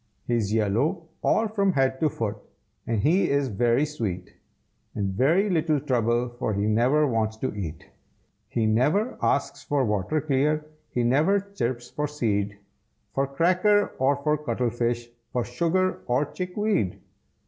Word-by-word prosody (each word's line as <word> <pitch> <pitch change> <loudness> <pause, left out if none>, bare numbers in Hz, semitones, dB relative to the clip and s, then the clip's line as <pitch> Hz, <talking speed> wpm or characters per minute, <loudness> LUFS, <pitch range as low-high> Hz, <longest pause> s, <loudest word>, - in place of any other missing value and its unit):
He's 115 -4 0
yellow 125 - 0
all 225 - +2
from 200 -3 +1
head 130 -2 +1
to 155 - +2
foot, 110 -5 -3 0.5
And 115 -2 0
he 175 - +3
is 140 -1 +1
very 120 +6 +2
sweet, 105 -12 -4 0.6
And 100 -2 -1
very 160 - +3
little 160 -5 +1
trouble, 120 -1 +1
for 110 - -1
He 100 +1 0
never 125 +8 +3
wants 110 -4 0
to 130 - -3
eat. 80 -6 -6 0.6
He 115 - 0
never 150 - +2
asks - - 0
for 140 -3 +1
water 105 +8 0
clear, 150 +1 +1 0.2
He 120 - -1
never 150 +12 +3
chirps 130 -12 -4
for 150 0 -2
seed, 105 -8 -1 0.6
For 135 0 +1
cracker 185 +8 +3
or 135 +2 +3
for 150 0 +2
cuttlefish, 120 -4 -1 0.3
For 125 - +1
sugar 170 +10 0
or 125 +4 +2
chickweed. 180 - -1
130 Hz, 145 wpm, -26 LUFS, 115-155 Hz, 0.6 s, he